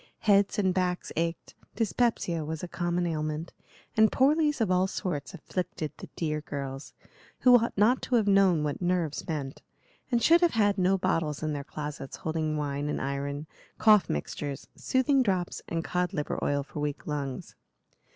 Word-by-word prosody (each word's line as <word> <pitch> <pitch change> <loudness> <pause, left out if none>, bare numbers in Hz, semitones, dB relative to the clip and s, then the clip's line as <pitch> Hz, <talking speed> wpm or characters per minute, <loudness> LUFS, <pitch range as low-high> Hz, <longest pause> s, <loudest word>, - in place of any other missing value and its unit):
Heads 200 -1 +3
and 190 -3 +2
backs 180 -1 -1
ached, 165 +1 -2 0.2
dyspepsia 225 -7 0
was 160 +2 -5
a - - -3
common 175 0 -1
ailment, 155 0 -3 0.4
and 220 0 +5
poorlies 295 +2 +3
of 215 -5 +1
all 185 +1 +3
sorts 175 -7 -4
afflicted 170 -4 -4
the - - -9
dear 155 -2 -2
girls, 140 -2 -6 0.5
who 245 -1 +7
ought 230 -1 -3
not 230 +6 +4
to 250 - 0
have 225 -3 +3
known 195 -5 +4
what 150 +2 -2
"nerves" 175 -4 -1
meant, 145 -4 -4 0.5
and 240 - +3
should 335 +1 +6
have 345 -2 +3
had 205 -3 +3
no 185 +1 +3
bottles 155 -4 -1
in 155 -1 -1
their 145 -1 -4
closets 150 -2 -6
holding 155 -1 -2
wine 145 0 -2
and - - -2
iron, 140 +2 -3 0.3
cough 210 -3 +5
mixtures, 140 - -4
soothing 265 +1 +2
drops 185 -7 -1
and 165 -1 -2
cod 180 +2 -1
liver 150 -5 -2
oil 145 0 +1
for 150 - -8
weak 145 -1 -3
lungs. 140 -3 -4
170 Hz, 170 wpm, -28 LUFS, 150-200 Hz, 0.5 s, who